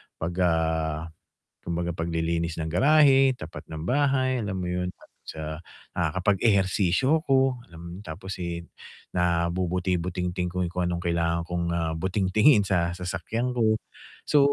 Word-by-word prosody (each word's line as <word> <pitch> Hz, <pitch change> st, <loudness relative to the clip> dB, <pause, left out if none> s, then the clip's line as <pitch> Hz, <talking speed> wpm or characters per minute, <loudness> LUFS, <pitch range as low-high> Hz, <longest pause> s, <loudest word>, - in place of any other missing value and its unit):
pag, 85 Hz, +2 st, -3 dB
ah, 80 Hz, -2 st, +1 dB, 0.6 s
kumbaga 85 Hz, 0 st, -2 dB
paglilinis 85 Hz, 0 st, -1 dB
ng 80 Hz, -, -2 dB
garahe, 135 Hz, -, +5 dB
tapat 80 Hz, -7 st, -8 dB
ng 80 Hz, -1 st, -5 dB
bahay, 130 Hz, -2 st, +2 dB
alam 95 Hz, -2 st, -3 dB
mo 90 Hz, -, -3 dB
yun. 90 Hz, 0 st, -2 dB, 0.3 s
So, 80 Hz, -, -7 dB, 0.6 s
nakakapag-ehersisyo 95 Hz, -, +2 dB
ako, 135 Hz, -2 st, +3 dB
alam 85 Hz, -2 st, -12 dB
mo 85 Hz, 0 st, -8 dB
tapos, 95 Hz, +2 st, -6 dB
eh, 85 Hz, -2 st, -5 dB, 0.5 s
nabubuti-butingting 90 Hz, 0 st, 0 dB
ko 90 Hz, -, -2 dB
kung 90 Hz, +1 st, -2 dB
anong 85 Hz, 0 st, -1 dB
kailangan 85 Hz, -1 st, 0 dB
kong, 85 Hz, -1 st, -1 dB
ah, 80 Hz, -1 st, 0 dB
butingtingin 100 Hz, -, +3 dB
sa 85 Hz, -3 st, +1 dB
sasakyan 90 Hz, +8 st, -3 dB
ko. 110 Hz, -2 st, +2 dB, 0.5 s
So, 150 Hz, -, +5 dB
90 Hz, 130 wpm, -26 LUFS, 85-105 Hz, 0.6 s, garahe